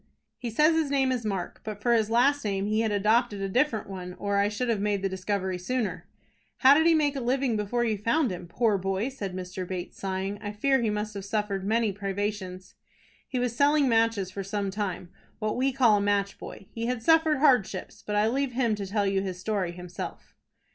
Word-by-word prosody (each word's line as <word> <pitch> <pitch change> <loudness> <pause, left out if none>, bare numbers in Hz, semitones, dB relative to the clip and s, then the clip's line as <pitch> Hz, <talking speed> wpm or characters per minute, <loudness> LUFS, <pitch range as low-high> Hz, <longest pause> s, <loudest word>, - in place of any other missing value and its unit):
"He 240 - -4
says 300 +8 +4
his 320 -3 +1
name 270 -2 +2
is 240 -4 -2
Mark, 190 -4 -4
but 210 -2 -6
for 235 +3 +2
his 220 -2 +2
last 270 +5 +3
name 200 -2 -1
he 215 +1 +1
had 225 -1 +1
adopted 210 +1 +2
a 195 - -2
different 240 +1 +1
one, 180 -2 -7
or 200 0 -1
I 200 +1 +3
should 230 +4 -2
have 225 -4 0
made 205 -1 0
the 195 - +1
discovery 190 -1 -2
sooner." 185 -4 -2 0.5
"How 265 +1 +7
did 320 +3 +4
he 335 - +5
make 295 -2 +2
a - - -2
living 255 0 +1
before 215 +3 0
you 215 -3 -1
found 235 +4 +1
him? 175 -1 -6
Poor 210 +2 +1
boy!" 195 +5 -1
said 200 -9 -6
Mr. 185 0 -5
Bates, 180 -1 -6
sighing, 195 +1 -3
"I 205 -1 -5
fear 265 +5 +2
he 225 - +1
must 210 0 -2
have 200 -1 -6
suffered 200 -2 -2
many 220 +1 +1
privations." 195 -1 -4 0.5
"He 260 - -3
was 245 -1 -1
selling 285 +1 +4
matches 225 -5 +2
for 195 +1 -5
some 200 0 -2
time, 190 -3 -4 0.3
what 215 -1 -2
we 265 +2 +1
call 245 -5 +4
a - - 0
match 200 -1 0
boy. - - -9
He 230 0 -3
had 245 -2 -2
suffered 320 0 +4
hardships, 260 -8 +2
but 210 - -3
I 210 +1 +3
leave 265 +2 0
him 235 -3 +1
to 200 -1 -4
tell 205 +1 0
you 195 -1 +1
his 190 -2 -4
story 195 -3 -1
himself." 180 0 -8
210 Hz, 220 wpm, -27 LUFS, 195-245 Hz, 0.5 s, How